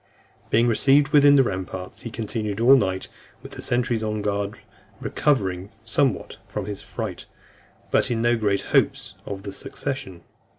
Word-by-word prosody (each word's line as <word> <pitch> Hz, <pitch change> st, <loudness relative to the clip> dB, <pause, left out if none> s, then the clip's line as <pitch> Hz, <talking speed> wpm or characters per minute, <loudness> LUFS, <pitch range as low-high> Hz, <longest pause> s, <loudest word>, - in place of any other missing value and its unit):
Being 115 Hz, +2 st, +4 dB
received 135 Hz, +5 st, +4 dB
within 145 Hz, -1 st, +6 dB
the 135 Hz, -, +6 dB
ramparts, 95 Hz, -4 st, -5 dB
he 115 Hz, -, -6 dB
continued 110 Hz, -2 st, -3 dB
all 125 Hz, +4 st, +7 dB
night 95 Hz, -6 st, 0 dB, 0.4 s
with -, -, -10 dB
the -, -, -7 dB
sentries 120 Hz, -2 st, 0 dB
on 105 Hz, -1 st, -2 dB
guard, 100 Hz, 0 st, -2 dB, 0.4 s
recovered 95 Hz, -10 st, 0 dB, 0.2 s
somewhat 120 Hz, +2 st, 0 dB
from 105 Hz, -2 st, -4 dB
his 105 Hz, -1 st, -5 dB
fright, -, -, -6 dB, 0.6 s
but -, -, +2 dB
in 120 Hz, -2 st, 0 dB
no 120 Hz, +1 st, +3 dB
great 105 Hz, -3 st, +1 dB
hopes -, -, +2 dB
of 95 Hz, -1 st, -5 dB
the 100 Hz, -1 st, -6 dB
succession. 135 Hz, -6 st, -5 dB
110 Hz, 155 wpm, -24 LUFS, 100-130 Hz, 0.6 s, all